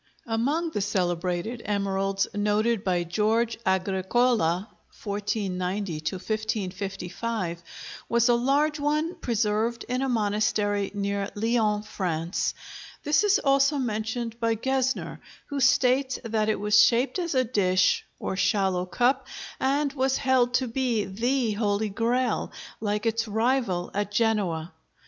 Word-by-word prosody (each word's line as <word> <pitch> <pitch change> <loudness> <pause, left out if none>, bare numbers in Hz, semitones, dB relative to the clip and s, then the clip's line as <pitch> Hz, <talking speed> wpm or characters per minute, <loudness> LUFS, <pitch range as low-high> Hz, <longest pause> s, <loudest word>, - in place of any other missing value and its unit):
Among 280 +9 0
the 205 - -2
celebrated 180 +3 -1
emeralds 195 -1 0
noted 210 +1 +1
by 180 -2 +1
George 220 +6 0
Agricola 190 0 +1 0.4
(1490 200 -2 -2 0.2
1555) 195 -2 -3 0.5
was 235 +1 +3
a 240 - +5
large 285 +5 +2
one 305 +3 0
preserved 230 - -1
in 250 +1 -1
a 270 - 0
monastery 210 -2 +1
near 200 0 -1
Lyons, 215 -1 +1
France. 170 -3 -2 0.5
This 300 +7 +3
is 410 -1 +4
also 275 +1 +3
mentioned 230 -1 -3
by 230 -1 +1
Gesner, 265 +3 -1 0.3
who 285 -1 -2
states 260 0 +3
that 220 -2 0
it 215 - 0
was 210 0 +5
shaped 250 +9 +2
as 340 -5 -2
a 255 - +4
dish, 185 -6 +2
or - - -3
shallow 190 -2 +1
cup, 255 +8 +1 0.3
and 280 +1 +1
was 265 -1 +1
held 250 -2 +2
to 260 0 +1
be 235 -3 0
the 235 +4 0
Holy 210 0 0
Grail, 235 +4 0 0.3
like 210 0 -2
its 225 0 0
rival 220 -4 0
at 205 0 -2
Genoa. 205 -7 0
220 Hz, 125 wpm, -26 LUFS, 200-250 Hz, 0.5 s, a